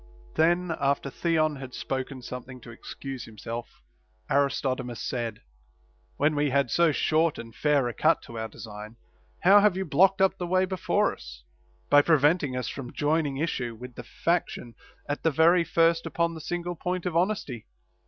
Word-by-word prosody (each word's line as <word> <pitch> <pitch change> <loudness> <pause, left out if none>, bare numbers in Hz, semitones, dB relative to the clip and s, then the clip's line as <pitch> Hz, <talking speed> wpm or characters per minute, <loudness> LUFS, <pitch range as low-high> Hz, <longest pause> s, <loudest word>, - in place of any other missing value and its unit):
Then, 170 +1 +2
after 140 0 0
Theon 155 -2 +1
had 130 -2 -8
spoken 130 -1 -4
something 125 +1 -8
to 115 - -11
excuse 130 +2 -8
himself, 115 +2 -8 0.5
Aristodemus 130 -3 0
said: 120 -3 -4 0.7
When 150 +2 +2
we 145 0 +1
had 135 -3 +1
so 170 +3 +4
short 155 +2 +1
and 115 -1 -9
fair 145 -2 +2
a 120 - -3
cut 160 +7 +2
to 115 -1 -8
our 110 - -3
design, 105 0 -10 0.5
how 195 +3 +8
have 205 -2 +3
you 190 - -2
blocked 190 +4 +4
up 190 0 +2
the 175 - -3
way 185 +1 +2
before 185 -1 0
us, - - -12 0.5
by 145 0 +8
preventing 150 -3 +2
us 125 -2 -3
from 125 -1 -6
joining 150 -2 0
issue 125 -6 -2
with 125 +2 -10
the 120 - -9
faction 165 -5 -2 0.3
at 145 - -3
the 160 - +3
very 165 +3 +4
first 165 0 +2
upon 170 0 0
the 160 - -8
single 175 +2 -3
point 180 +1 -3
of 175 -2 -2
honesty 170 - -1
145 Hz, 170 wpm, -27 LUFS, 125-170 Hz, 0.7 s, how